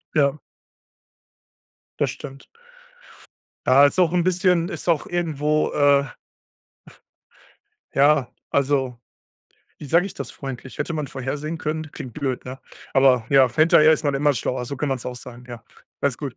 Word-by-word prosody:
Ja. 145 -1 +2 1.6
Das - - +1
stimmt. 135 -1 -9 1.2
Ja, 135 +3 +7
ist 145 - +1
auch 175 -2 +3
'n 175 -1 +2
bisschen 180 -1 +2
ist - - -6
auch 165 -4 +2
irgendwo, 155 -3 0
äh 140 -1 +4 1.9
Ja. 140 -2 +3 0.2
Also, 135 -3 0 0.8
wie 150 - -8
sage 170 +6 +3
ich 195 - -7
das - - -6
freundlich? 130 -2 -8
Hätte 170 - -3
man 150 -3 -3
vorhersehen 145 +4 -4
können 155 0 -4
klingt 125 - -8
blöd, 135 -4 -3
ne? 130 +1 -7 0.4
Aber 130 -3 +4
ja, 135 -3 +4
hinterher 155 -1 +5
ist 160 - +1
man 145 - +1
immer 145 +1 +2
schlauer, 125 0 -2
so 140 +2 -6
kann 150 - -2
man 135 - 0
es - - -11
auch 125 - -5
sagen, 125 0 -11
ja. 120 -2 -9 0.4
Alles 140 -4 0
gut. 140 -6 -6
140 Hz, 155 wpm, -22 LUFS, 130-155 Hz, 1.9 s, Ja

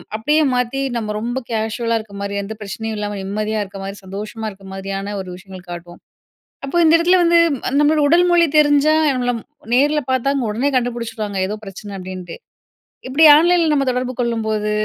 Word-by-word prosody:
அப்பிடியே 300 +8 +2
மாத்தி, 250 +2 -1
அ - - -5
நம்ம 215 -2 -3
ரொம்ப 245 +3 -3
கேஷுவலா 225 +1 -1
இருக்க 215 -2 -12
மாரி, 200 0 -4
எந்த 215 +2 -6
பிரச்சனையும் 220 +2 -5
இல்லாம 205 -1 -3
நிம்மதியா 215 +2 -2
இருக்க 195 0 -10
மாதிரி, 195 +1 -6
சந்தோஷமா 210 +3 -6
இருக்க 195 0 -16
மாதிரியான 195 +1 -5
ஒரு 185 - -9
விஷயங்கள் 185 -1 -12
காட்டுவோம். 175 0 -9 0.7
அப்போ 275 - -4
இந்த 320 - +5
இடத்தில 360 +2 +4
வந்து, 340 0 +4 0.4
நம்மளோட 300 +1 +3
உடல் 350 +3 +4
மொழி 340 -1 +5
தெரிஞ்சா, 290 +1 +4 0.2
இல்ல 250 -2 -1
நம்மள 230 -2 -6 0.3
நேர்ல 295 +3 +3
பார்த்தா, 260 +2 +1 0.2
உடனே 250 +7 0
கண்டுபிடிச்சுடுவாங்க. 230 -4 -3
ஏதோ 210 - -3
பிரச்சனை, 200 +1 -9
அப்பிடீன்ட்டு. 185 -2 -8 0.7
இப்பிடி 285 +5 +4
ஆன்லைன்ல 340 0 +3
நம்ம 275 -2 +1
தொடர்பு 250 0 -2
கொள்ளும்போது, 220 -3 -1
225 Hz, 170 wpm, -19 LUFS, 200-275 Hz, 0.7 s, இந்த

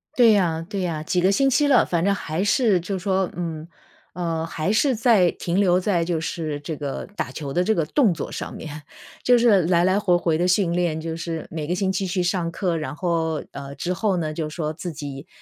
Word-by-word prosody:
对 235 -3 +6
呀 165 -5 +1
对 200 -2 -3
呀， 160 -4 -2
几 180 - 0
个 185 +2 +3
星 270 +7 +3
期 290 +3 +3
了， 265 -4 +5
反 170 0 0
正 200 0 +3
还 160 -1 -3
是 205 -2 +3
就 190 +3 -3
是 180 - -9
说 190 -2 +1
嗯， 165 -2 -5 0.5
呃， 165 -2 -2
还 165 +2 -2
是 255 +4 +2
在 215 -6 +4
停 175 +3 -2
留 180 -3 +4
在 180 -2 +1
就 165 -2 -1
是 160 -3 -3
这 150 +1 -5
个 140 -2 -4
打 - - -2
球 145 -3 -5
的 175 - +1
这 220 - +2
个 165 - +1
动 235 - +3
作 - - -6
上 - - -5
面， 150 -1 -8 0.4
就 245 -1 +5
是 220 -6 +4
来 170 +1 +3
来 185 +2 +3
回 180 -4 +3
回 165 -2 +1
地 175 - +1
训 180 -1 +2
练， 170 -2 0
就 165 0 -4
是 165 -1 -4
每 155 -2 -4
个 175 - 0
星 190 0 0
期 190 0 -1
去 180 0 0
上 175 -1 0
课， 170 0 -1
然 145 -3 -4
后 165 -2 -1
呃， 140 0 -8
之 175 - -3
后 195 0 0
呢， 155 -3 -2
就 155 -1 -3
说 155 -1 -3
自 165 +2 -6
己 145 0 -7
175 Hz, 255 characters per minute, -23 LUFS, 160-195 Hz, 0.5 s, 对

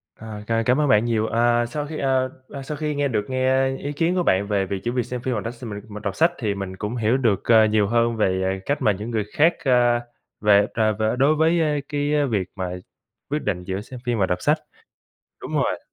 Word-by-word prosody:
Ờ. 110 -2 -8
C 115 0 0
cảm 125 +3 +3
ơn 150 - +2
bạn 105 -1 +4
nhiều. 115 -2 +1
Ờ, 120 +1 +2
Sau 145 +5 -4
khi, 155 - -6
ờ, 130 -1 +1 0.2
ờ, 140 - -7
sau 150 +2 -6
khi 150 -1 -2
nghe 145 0 +1
được 110 -5 -1
nghe 130 +1 +1
ý 145 - -5
kiến 165 +5 0
của 180 - +1
bạn 100 - +2
về 100 -2 0
việc 95 0 -3
chỉ 120 - -1
việc 125 0 0
xem 125 -1 -5
phim 130 0 -2
rồi 105 - -2
đó 115 - -3
s 120 +1 -15
mình 105 -3 -6
mình 105 0 -8
đọc 100 -2 -3
sách, 165 +2 +3
thì 110 -5 -1
mình 95 -1 -5
cũng 105 +5 -4
hiểu 115 +2 +2
được, 115 -7 +1
ờ, 110 -2 +6
nhiều 105 -1 +2
hơn 115 +1 +1
về 95 -2 0
cách 145 - -1
mà 105 - +4
những 105 +4 -5
người 110 -2 0
khác, 160 +4 +4
a, 120 -3 +3 0.4
về, 105 -1 +5
à, 110 -1 +2
về 110 +2 0
đối 150 +3 +4
với, 165 +2 +3
ơ, 155 - +2 0.2
cái 145 0 -1 0.2
việc 100 -5 -1
mà 95 -3 -3 0.6
quyết 150 +2 -1
định 90 -4 -2
giữa 95 +2 -4
xem 125 +3 -10
phim 120 -2 0
và 100 - +3
đọc 90 -1 -2
sách. 150 +2 +3 0.8
Đúng - - -6
rồi. - - +1
115 Hz, 250 wpm, -23 LUFS, 105-135 Hz, 0.8 s, ờ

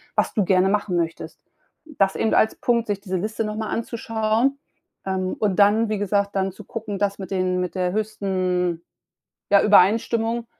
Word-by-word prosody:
was - - +1
du 210 -5 +1
gerne 185 +1 +3
machen 205 -2 0
möchtest. 165 -1 -4 0.4
Das 195 -11 0
eben 220 - 0
als 220 - +3
Punkt, 235 -2 0
sich 200 -1 -2
diese 190 -2 -3
Liste 215 +4 -3
noch 210 0 -4
mal 220 -1 -3
anzuschauen, 230 +2 -1 0.5
ähm, 190 -1 -2
und 205 -4 0
dann 210 +2 +4
wie 215 - -1
gesagt, 200 0 0
dann 195 0 0
zu - - -12
gucken, 210 -3 -6
das 200 -1 0
mit 195 0 -7
den 185 -1 0
mit 180 -1 -3
der 180 -1 0
höchsten, 185 -5 -1 0.7
ja, 200 - +6
Übereinstimmung 225 +3 +3
205 Hz, 175 wpm, -23 LUFS, 185-220 Hz, 0.7 s, ja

